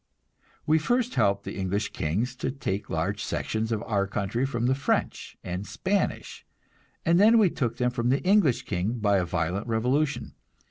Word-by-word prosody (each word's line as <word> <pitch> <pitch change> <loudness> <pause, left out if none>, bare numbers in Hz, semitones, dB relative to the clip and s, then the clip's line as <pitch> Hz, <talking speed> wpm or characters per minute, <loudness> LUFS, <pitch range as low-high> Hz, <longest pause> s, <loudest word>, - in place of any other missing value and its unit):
We 155 +1 +4
first 245 +9 0
helped 100 0 +2
the - - -6
English 100 +2 -2
kings 110 +12 -1
to 130 - -2
take 115 -7 -4
large - - -2
sections 110 +1 -2
of 110 -2 -1
our 100 -3 0
country 105 +6 -1
from 120 -3 -2
the 130 - +3
French 140 +1 -2
and 90 +3 -4
Spanish, 195 +1 -2 0.6
and 170 +2 +4
then 220 +3 +6
we 205 -6 +4
took 120 -4 -2
them 125 0 +1
from 120 -1 -1
the 135 +2 +1
English 185 - +3
king 105 +5 -2
by 105 -3 +2
a 90 - 0
violent 90 +5 -2
revolution. 130 +6 0
120 Hz, 175 wpm, -27 LUFS, 100-145 Hz, 0.6 s, then